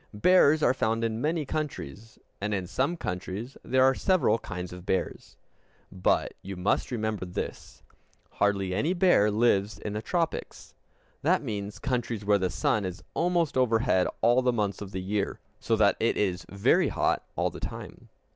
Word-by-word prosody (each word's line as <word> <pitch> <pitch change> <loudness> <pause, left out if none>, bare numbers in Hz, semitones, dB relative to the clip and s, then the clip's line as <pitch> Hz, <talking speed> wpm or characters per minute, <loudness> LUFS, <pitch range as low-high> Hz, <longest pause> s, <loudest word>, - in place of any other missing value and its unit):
Bears 155 - +5
are 125 - +5
found 115 -2 0
in 115 0 -1
many 155 +1 0
countries, 115 - -5 0.2
and 105 0 -1
in 95 -2 -3
some 135 - -1
countries 95 - -5
there 130 0 +3
are 135 0 +5
several 170 - +2
kinds 90 -3 -6
of 90 -1 -9
bears. 95 0 -3 0.5
But 95 -2 +1
you 95 +1 -7
must 90 +3 0
remember 110 -4 -2
this: 90 -1 -6 0.5
hardly 100 -2 0
any 150 - +1
bear 175 - +4
lives 105 -2 +2
in 105 - -5
the 105 - -3
tropics; 165 +7 -3 0.5
that - - +2
means 100 -2 -4
countries 120 -5 -2
where 100 0 +4
the 95 -1 0
sun 90 +6 0
is 95 +1 -5
almost 170 -3 +1
overhead 115 -6 +2
all 120 +2 +4
the 125 -1 +2
months 105 -5 -2
of 100 -1 -7
the 95 -1 -4
year, 100 +1 -2 0.2
so - - +1
that - - +3
it - - +1
is 95 -3 -1
very 100 0 +3
hot - - 0
all - - 0
the - - -9
time. - - -8
105 Hz, 170 wpm, -28 LUFS, 95-130 Hz, 0.5 s, Bears